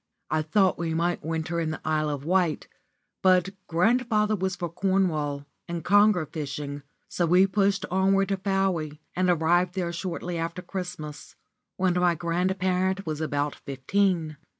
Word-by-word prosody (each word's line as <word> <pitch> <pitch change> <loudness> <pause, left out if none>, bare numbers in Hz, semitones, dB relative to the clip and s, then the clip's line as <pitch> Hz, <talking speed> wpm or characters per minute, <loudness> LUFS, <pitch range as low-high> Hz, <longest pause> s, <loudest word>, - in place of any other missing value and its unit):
I 155 0 +2
thought 185 +4 +2
we 165 -1 -1
might 170 +1 0
winter 160 +2 -2
in 165 -1 -1
the 160 - -4
Isle 155 -1 +1
of 145 -1 -4
Wight, 180 -2 +1 0.5
but 185 -1 +4 0.2
grandfather 215 +4 +2
was 190 -1 -2
for 175 -1 -3
Cornwall 165 -6 0 0.2
and 170 -1 -4
conger 205 -4 +5
fishing, 145 -1 -5 0.3
so 175 - 0
we 180 +3 +6
pushed 195 0 +1
onwards 195 +1 +2
to 195 - 0
Fowey, 190 -6 -1 0.2
and 185 0 +2
arrived 175 +2 +2
there 175 -2 -2
shortly 175 -1 -4
after 170 +2 -4
Christmas, 180 -5 -7 0.4
when 185 -1 +2
my 180 -1 +2
grandparent 185 +3 0
was 155 -1 -3
about 145 -1 -1
fifteen. 160 +3 -1
175 Hz, 150 wpm, -26 LUFS, 160-190 Hz, 0.5 s, we